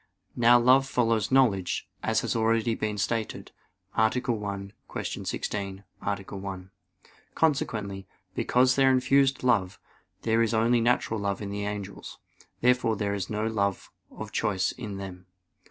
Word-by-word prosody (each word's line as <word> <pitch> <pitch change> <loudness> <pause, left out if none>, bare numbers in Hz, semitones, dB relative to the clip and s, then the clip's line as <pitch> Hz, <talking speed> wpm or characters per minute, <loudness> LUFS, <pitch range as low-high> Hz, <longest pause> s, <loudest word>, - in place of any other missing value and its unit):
Now 120 0 +6
love 130 +3 +5
follows 115 -4 +1
knowledge, 110 -9 +2
as - - +1
has - - -1
been 115 - 0
already 110 -1 +1
stated 110 +2 -2 0.4
(A. 110 0 +4
1; 105 -5 -3 0.2
Q. - - -4
16, 100 -1 -4 0.2
A. 100 - 0
1). 95 -1 -8 0.6
Consequently, 105 - 0 0.3
besides 125 +1 +3
their 135 0 +4
infused 135 +1 +3
love, 100 -7 +1 0.4
there 115 0 +2
is 115 0 +1
only 115 +2 +3
natural 115 -2 +1
love 100 -1 -1
in 100 -1 -5
the 100 0 -3
angels. 100 -1 -6 0.4
Therefore 125 -2 +3
there 100 -1 -1
is 100 -2 -3
no 105 0 -1
love 100 -3 -1 0.2
of - - -8
choice 95 -3 0
in 105 -6 -7
them. 95 -2 -8
110 Hz, 140 wpm, -27 LUFS, 100-120 Hz, 0.6 s, Now